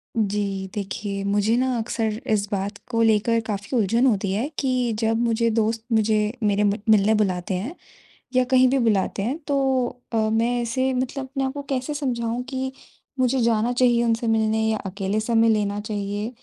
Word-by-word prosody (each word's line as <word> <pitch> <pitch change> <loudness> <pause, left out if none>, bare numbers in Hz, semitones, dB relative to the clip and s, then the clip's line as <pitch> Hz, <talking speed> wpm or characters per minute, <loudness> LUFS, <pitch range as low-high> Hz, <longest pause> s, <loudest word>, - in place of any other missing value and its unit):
जी, 200 -2 -1
देखिए 200 0 -4
मुझे 205 +3 +2
ना 255 -1 +1
अक्सर 225 -1 -2
इस 205 -1 0
बात 200 0 -2
को 230 -1 +1
लेकर 225 +1 +3
काफ़ी 205 +4 -2
उलझन 230 +4 +2
होती 200 -5 +1
है 225 +8 -1
कि 255 -3 0
जब 225 0 +1
मुझे 230 0 +1
दोस्त 225 +1 0
मुझे 215 -1 +2
मेरे 205 0 +2
म 205 -1 +3 0.2
मिलने 215 0 +5
बुलाते 190 -2 0
हैं, 220 - -4 0.6
या 255 - +5
कहीं 255 0 +4
भी 270 +2 +2
बुलाते 210 -5 +1
हैं 255 +9 -2
तो 285 - 0 0.6
अ, - - 0
मैं 235 +2 +1
ऐसे 260 +3 0
मतलब 260 +2 -2
अपने 270 +1 -3
आप 265 - -1
को 285 +1 -6
कैसे 275 +1 -3
समझाऊँ 240 -4 -2
कि 265 -1 -3 0.5
मुझे 255 +1 +2
जाना 230 +1 +2
चाहिए 240 -1 +3
उनसे 230 0 0
मिलने 220 0 +2
या 220 -1 0
अकेले 195 +2 -2
समय 225 +1 +3
लेना 205 -2 +1
चाहिए 205 0 -3
225 Hz, 180 wpm, -23 LUFS, 205-250 Hz, 0.6 s, मिलने